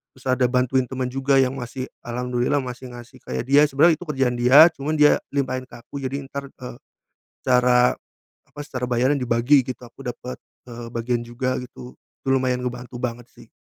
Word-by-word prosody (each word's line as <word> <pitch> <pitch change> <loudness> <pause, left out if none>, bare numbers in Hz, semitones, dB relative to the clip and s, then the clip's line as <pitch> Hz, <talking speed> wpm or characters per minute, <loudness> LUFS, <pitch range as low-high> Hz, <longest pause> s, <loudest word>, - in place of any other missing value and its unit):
terus 130 0 -11
ada 130 0 +2
bantuin 125 +1 +2
teman 130 -1 -3
juga 135 +1 +2
yang 130 0 +2
masih, 130 +1 -6 0.2
alhamdulillah 125 +3 -1
masih 125 0 -8
ngasih 120 0 -12
kayak - - -4
dia. 140 +2 +6
Sebenarnya 155 +4 +4
itu 180 - -8
kerjaan 130 -4 0
dia, 135 +7 +8
cuman 150 +3 -2
dia 150 - +6
limpahin 130 -2 -1
ke - - -12
aku, 140 +4 -8
jadi 135 +1 -3
entar, 140 0 -6
eee, 125 -3 -10 0.7
secara, 125 -1 +4 0.5
apa, - - -14
secara 130 -3 -6
bayaran 125 +4 +2
dibagi, 125 +3 +3
gitu. 130 -1 -6
Aku 125 - -16
dapet, 125 +1 -6 0.3
eee, 120 -1 -8
bagian 120 +1 -1
juga 125 +2 -2
gitu. 65 - -11 0.3
Lumayan 130 -1 +1
ngebantu 125 0 -6
banget, 120 -1 -4
sih. - - -17
125 Hz, 175 wpm, -23 LUFS, 125-135 Hz, 0.7 s, dia